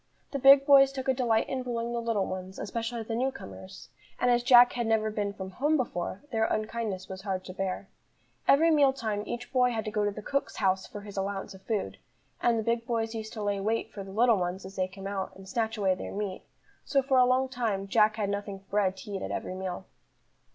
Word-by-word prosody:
The 280 Hz, -, -2 dB
big 275 Hz, +1 st, +8 dB
boys 275 Hz, -1 st, +7 dB
took 265 Hz, -1 st, -5 dB
a 265 Hz, -, +4 dB
delight 235 Hz, -4 st, +1 dB
in 265 Hz, -, -2 dB
bullying 235 Hz, -1 st, -3 dB
the 235 Hz, -, -1 dB
little 225 Hz, -4 st, 0 dB
ones, 185 Hz, +1 st, -6 dB
especially 230 Hz, +2 st, -3 dB
the 225 Hz, -, -5 dB
new 250 Hz, +4 st, +1 dB
comers; 190 Hz, -3 st, -11 dB, 0.3 s
and 245 Hz, -, +3 dB
as 240 Hz, 0 st, +3 dB
Jack 245 Hz, 0 st, +7 dB
had 240 Hz, -2 st, -1 dB
never 220 Hz, -1 st, +1 dB
been 205 Hz, -1 st, -2 dB
from 190 Hz, -1 st, -7 dB
home 295 Hz, +10 st, +1 dB
before, 195 Hz, -4 st, -3 dB
their 220 Hz, -2 st, +2 dB
unkindness 215 Hz, -4 st, -2 dB
was 190 Hz, 0 st, -7 dB
hard 190 Hz, -2 st, -3 dB
to 185 Hz, -, -7 dB
bear. 190 Hz, 0 st, -3 dB, 0.6 s
Every 325 Hz, +4 st, +6 dB
meal 285 Hz, -3 st, +5 dB
time 215 Hz, -5 st, -2 dB
each 240 Hz, +1 st, -6 dB
boy 250 Hz, -1 st, +4 dB
had 225 Hz, -3 st, -3 dB
to 215 Hz, -, -3 dB
go 210 Hz, 0 st, 0 dB
to 205 Hz, -, +2 dB
the 210 Hz, +1 st, -7 dB
cook's 280 Hz, +5 st, -2 dB
house 190 Hz, -2 st, +1 dB
for 205 Hz, -, -8 dB
his 205 Hz, -1 st, -10 dB
allowance 195 Hz, 0 st, -3 dB
of 190 Hz, -, -13 dB
food, 195 Hz, -, -3 dB, 0.4 s
and 235 Hz, -1 st, +3 dB
the 220 Hz, -, -1 dB
big 230 Hz, +1 st, -1 dB
boys 225 Hz, -1 st, -1 dB
used 220 Hz, -1 st, -6 dB
to 215 Hz, -, -5 dB
lay 205 Hz, -1 st, 0 dB
wait 220 Hz, +2 st, -1 dB
for 200 Hz, -, -6 dB
the 195 Hz, -, -11 dB
little 230 Hz, +2 st, +4 dB
ones 180 Hz, +1 st, -3 dB
as 190 Hz, +1 st, -10 dB
they 185 Hz, 0 st, 0 dB
came 195 Hz, +1 st, -11 dB
out, 195 Hz, -1 st, -4 dB
and 190 Hz, 0 st, -13 dB
snatch 225 Hz, +1 st, -1 dB
away 195 Hz, -3 st, +2 dB
their 185 Hz, -, -6 dB
meat; 200 Hz, -2 st, -4 dB, 0.4 s
so 275 Hz, -2 st, +1 dB
for 265 Hz, -1 st, +3 dB
a 250 Hz, -, +7 dB
long 255 Hz, +1 st, +2 dB
time 225 Hz, -7 st, -2 dB
Jack 215 Hz, +1 st, +4 dB
had 205 Hz, -2 st, -1 dB
nothing 200 Hz, -1 st, -4 dB
but 195 Hz, 0 st, -23 dB
bread 195 Hz, -2 st, +1 dB
to 205 Hz, -, -9 dB
eat 195 Hz, -1 st, -3 dB
at -, -, -4 dB
every -, -, -4 dB
meal. 185 Hz, 0 st, -5 dB
215 Hz, 240 wpm, -29 LUFS, 195-240 Hz, 0.6 s, big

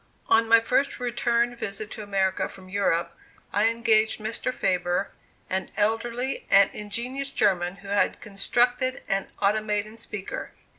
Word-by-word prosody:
On 225 Hz, 0 st, +5 dB
my 230 Hz, 0 st, +7 dB
first 250 Hz, +5 st, 0 dB
return 240 Hz, -1 st, +1 dB
visit 215 Hz, -2 st, -5 dB
to 220 Hz, -, -6 dB
America 195 Hz, -2 st, 0 dB
from 185 Hz, -1 st, -13 dB
Europe, 185 Hz, -4 st, 0 dB, 0.4 s
I 205 Hz, +2 st, +3 dB
engaged 225 Hz, -1 st, +3 dB
Mr. 220 Hz, +4 st, -2 dB
Faber, 180 Hz, -4 st, 0 dB, 0.4 s
an 190 Hz, 0 st, -2 dB
elderly 230 Hz, +5 st, -1 dB
and 195 Hz, 0 st, +6 dB
ingenious 245 Hz, +7 st, -3 dB
German, 185 Hz, -7 st, +1 dB
who 195 Hz, 0 st, -14 dB
had 200 Hz, 0 st, +1 dB
constructed 245 Hz, +5 st, 0 dB
an 195 Hz, 0 st, 0 dB, 0.2 s
automaton 215 Hz, +1 st, 0 dB
speaker. 215 Hz, -3 st, -6 dB
215 Hz, 135 wpm, -26 LUFS, 195-235 Hz, 0.4 s, my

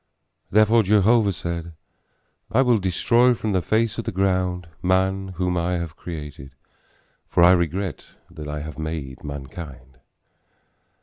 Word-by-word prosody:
Therefore 110 Hz, +3 st, +5 dB
Jehovah 105 Hz, +1 st, +4 dB
said, 85 Hz, -1 st, -5 dB, 0.8 s
I 130 Hz, +5 st, +4 dB
will 120 Hz, -4 st, +3 dB
destroy 115 Hz, +7 st, +3 dB
from 110 Hz, -2 st, -3 dB
the 95 Hz, -2 st, +1 dB
face 110 Hz, +5 st, 0 dB
of 115 Hz, -, -4 dB
the -, -, -2 dB
ground 90 Hz, -2 st, 0 dB
man 95 Hz, +1 st, +1 dB
whom 90 Hz, 0 st, 0 dB
I 85 Hz, +1 st, 0 dB
have 85 Hz, -2 st, -3 dB
created, 75 Hz, -6 st, -8 dB, 0.7 s
for 85 Hz, -, +3 dB
I 90 Hz, -, +8 dB
regret 90 Hz, 0 st, -1 dB, 0.2 s
that 80 Hz, -3 st, -8 dB
I 75 Hz, 0 st, -4 dB
have 80 Hz, +1 st, -8 dB
made 80 Hz, -4 st, -5 dB
mankind. 70 Hz, -2 st, -9 dB
90 Hz, 135 wpm, -23 LUFS, 80-100 Hz, 0.8 s, I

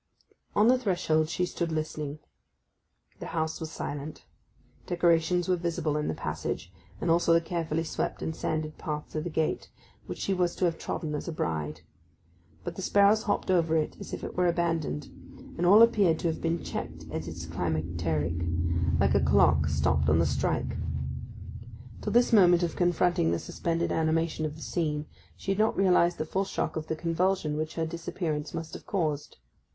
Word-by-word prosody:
On 210 Hz, +2 st, +5 dB
the 255 Hz, +1 st, +5 dB
threshold 160 Hz, -8 st, +1 dB
she 180 Hz, +1 st, 0 dB
stood 170 Hz, -1 st, -3 dB
listening. 155 Hz, -2 st, -3 dB, 1.0 s
The -, -, -6 dB
house 160 Hz, 0 st, -1 dB
was 160 Hz, -, -5 dB
silent. 145 Hz, -1 st, -6 dB, 0.6 s
Decorations 175 Hz, 0 st, +2 dB
were 185 Hz, -, +3 dB
visible 170 Hz, -3 st, -1 dB
in 150 Hz, -, -1 dB
the 80 Hz, -, -1 dB
passage, 90 Hz, +1 st, -4 dB, 0.3 s
and 165 Hz, -, +1 dB
also 170 Hz, 0 st, +4 dB
the 165 Hz, -, +6 dB
carefully 165 Hz, -1 st, -2 dB
swept 160 Hz, -, -3 dB
and 160 Hz, -, -3 dB
sanded 155 Hz, -1 st, -3 dB
path 150 Hz, -1 st, -4 dB
to 155 Hz, -, -2 dB
the 175 Hz, -, -4 dB
gate, 160 Hz, -1 st, -1 dB, 0.4 s
which -, -, -5 dB
she 195 Hz, -, -1 dB
was 180 Hz, -2 st, +1 dB
to 185 Hz, -, +1 dB
have 165 Hz, -1 st, 0 dB
trodden 155 Hz, -2 st, -3 dB
as 150 Hz, -, -4 dB
a -, -, -2 dB
bride; 80 Hz, -, -3 dB, 0.8 s
but -, -, -5 dB
the -, -, -5 dB
sparrows 205 Hz, +2 st, +4 dB
hopped 205 Hz, -3 st, 0 dB
over 165 Hz, -3 st, +3 dB
it 155 Hz, -, -1 dB
as -, -, -8 dB
if -, -, -5 dB
it -, -, -6 dB
were 180 Hz, 0 st, +3 dB
abandoned; 165 Hz, -4 st, 0 dB, 0.5 s
and 175 Hz, +1 st, +1 dB
all 210 Hz, +5 st, +9 dB
appeared 200 Hz, -8 st, +4 dB
to 170 Hz, -, -1 dB
have 160 Hz, -, -3 dB
been 165 Hz, 0 st, -1 dB
checked 80 Hz, 0 st, -5 dB
at 80 Hz, 0 st, -4 dB
its 85 Hz, 0 st, -6 dB
climacteric, 80 Hz, -1 st, -1 dB, 0.7 s
like -, -, +3 dB
a -, -, +4 dB
clock -, -, +4 dB
stopped 75 Hz, +1 st, +2 dB
on 75 Hz, -, +5 dB
the 85 Hz, -, +3 dB
strike. -, -, -1 dB, 1.2 s
Till -, -, -2 dB
this 240 Hz, 0 st, +4 dB
moment 180 Hz, -4 st, +6 dB
of 170 Hz, -, -1 dB
confronting 175 Hz, -1 st, +2 dB
the -, -, +1 dB
suspended 170 Hz, 0 st, -2 dB
animation 160 Hz, 0 st, +1 dB
of 150 Hz, -, -7 dB
the 160 Hz, -, -9 dB
scene 150 Hz, -3 st, -1 dB, 0.3 s
she 195 Hz, -, -3 dB
had 195 Hz, -, -1 dB
not 220 Hz, +1 st, +2 dB
realized 180 Hz, -2 st, +4 dB
the 155 Hz, -, -2 dB
full 190 Hz, +5 st, 0 dB
shock -, -, -2 dB
of 155 Hz, -1 st, -4 dB
the 160 Hz, -, -1 dB
convulsion 165 Hz, -1 st, 0 dB
which 155 Hz, +1 st, -3 dB
her 165 Hz, -, 0 dB
disappearance 160 Hz, -2 st, -3 dB
must 165 Hz, -1 st, -6 dB
have -, -, -9 dB
caused. 155 Hz, -7 st, -2 dB
165 Hz, 185 wpm, -28 LUFS, 150-175 Hz, 1.2 s, all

